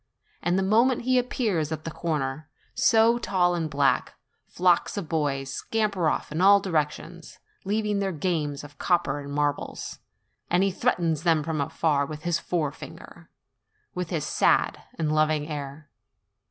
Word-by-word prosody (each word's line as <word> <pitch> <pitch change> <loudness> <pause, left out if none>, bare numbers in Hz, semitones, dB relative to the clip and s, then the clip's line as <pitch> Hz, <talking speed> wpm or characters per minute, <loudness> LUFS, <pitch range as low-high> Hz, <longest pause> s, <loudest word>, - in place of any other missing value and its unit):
And 175 +1 +1
the 190 - +1
moment 230 +6 +3
he 255 +1 +3
ap 250 0 -3
pears 175 - -1
at 155 0 -5
a - - -3
corner, 155 -2 -3 0.2
so 230 +1 +4
tall 180 -5 +1
and 165 -2 -2
black, 140 -2 +1 0.3
flocks 180 +2 +2
of 195 -5 -3
boys 135 -4 -1
scamper 200 -6 0
off - - -3
in 155 +3 -2
all 200 +1 +7
directions, 165 -1 -3 0.3
leaving 210 0 0
their 195 -1 -1
games 155 -4 -2
of 145 0 -13
coppers 145 -5 0
and - - -7
marbles, 145 -1 -2 0.5
and 180 +2 +3
he 195 - +2
threatens 175 - 0
them 165 -3 +2
from 155 -1 -2
afar 140 0 0
with 155 +1 -8
his 175 -1 0
forefinger, 155 -5 -5 0.6
with 180 -2 -4
his 160 -4 -2
sad - - +2 0.2
and 155 -2 0
loving 155 -1 +1
air. 145 0 -6
165 Hz, 155 wpm, -26 LUFS, 150-190 Hz, 0.6 s, all